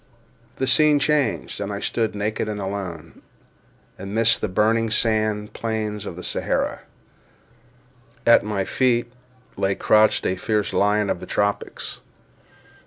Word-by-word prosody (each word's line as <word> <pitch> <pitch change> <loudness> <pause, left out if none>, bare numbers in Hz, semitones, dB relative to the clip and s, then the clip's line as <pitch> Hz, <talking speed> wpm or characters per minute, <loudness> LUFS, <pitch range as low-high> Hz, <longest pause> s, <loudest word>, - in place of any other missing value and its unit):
The 130 - -1
scene 150 +3 +5
changed; 140 - 0
and 100 0 -3
I 100 - -4
stood, 110 0 -1
naked 105 +1 -2
and 105 -1 -4
alone, 95 -5 -6 0.8
amidst 110 +4 +1
the - - 0
burning 110 +4 +1
sand 110 -2 0
plains 110 -2 -3
of 90 0 -7
Sahara. - - -1 1.5
At 115 - +6
my 100 -2 -2
feet 120 0 +1 0.4
lay 95 0 +1
crouched 110 0 +3
a 95 - 0
fierce 105 -2 -1
lion 105 0 +2
of - - -2
the - - -9
tropics. 100 0 -2
105 Hz, 125 wpm, -23 LUFS, 100-115 Hz, 1.5 s, At